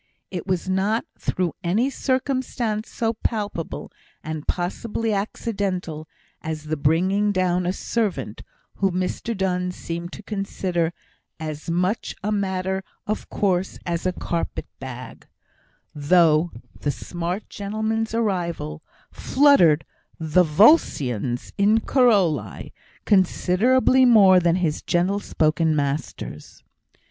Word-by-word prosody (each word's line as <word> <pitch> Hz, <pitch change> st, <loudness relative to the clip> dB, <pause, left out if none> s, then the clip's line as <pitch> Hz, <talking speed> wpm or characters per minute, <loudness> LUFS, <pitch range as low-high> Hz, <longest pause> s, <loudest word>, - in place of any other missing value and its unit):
It 180 Hz, -1 st, -5 dB
was 185 Hz, -1 st, -1 dB
not 195 Hz, +6 st, +1 dB
through 180 Hz, -2 st, -1 dB
any 215 Hz, +10 st, +1 dB
circumstance 255 Hz, -5 st, -1 dB
so 225 Hz, -1 st, -1 dB
palpable, 210 Hz, -7 st, -3 dB, 0.3 s
and 155 Hz, -1 st, -5 dB
possibly 215 Hz, +5 st, -2 dB
accidental, 195 Hz, -6 st, -3 dB, 0.3 s
as 155 Hz, -1 st, -4 dB
the 155 Hz, +1 st, -2 dB
bringing 185 Hz, +8 st, +2 dB
down 180 Hz, -2 st, +1 dB
a -, -, +2 dB
servant, 190 Hz, -, -2 dB, 0.4 s
whom 195 Hz, -2 st, +1 dB
Mr 190 Hz, +4 st, -2 dB
Donne 180 Hz, -1 st, 0 dB
seemed 170 Hz, 0 st, -6 dB
to 210 Hz, -, -9 dB
consider 185 Hz, -5 st, -2 dB, 0.5 s
as 155 Hz, 0 st, -5 dB
much 180 Hz, +6 st, -1 dB
a 210 Hz, -, -1 dB
matter 190 Hz, -2 st, -1 dB, 0.2 s
of 215 Hz, -, -3 dB
course 190 Hz, -2 st, 0 dB
as 170 Hz, +1 st, -1 dB
a -, -, +2 dB
carpet 170 Hz, -1 st, -3 dB
bag 130 Hz, -2 st, -9 dB, 0.7 s
(though 160 Hz, +2 st, +4 dB, 0.3 s
the 145 Hz, -, -1 dB
smart 175 Hz, +6 st, -4 dB
gentleman's 220 Hz, +2 st, -2 dB
arrival 170 Hz, -, -2 dB, 0.3 s
"fluttered 255 Hz, -, +4 dB, 0.3 s
the 160 Hz, +2 st, +3 dB
Volscians 145 Hz, -, +3 dB
in 210 Hz, +3 st, +4 dB
Corioli" 190 Hz, -, +1 dB, 0.3 s
considerably 220 Hz, +7 st, +3 dB
more 200 Hz, -6 st, +7 dB
than 170 Hz, -1 st, +2 dB
his 170 Hz, -5 st, 0 dB
gentle 185 Hz, +4 st, +1 dB
spoken 160 Hz, -3 st, +1 dB
master's). 140 Hz, -1 st, -4 dB
185 Hz, 110 wpm, -23 LUFS, 165-210 Hz, 0.7 s, more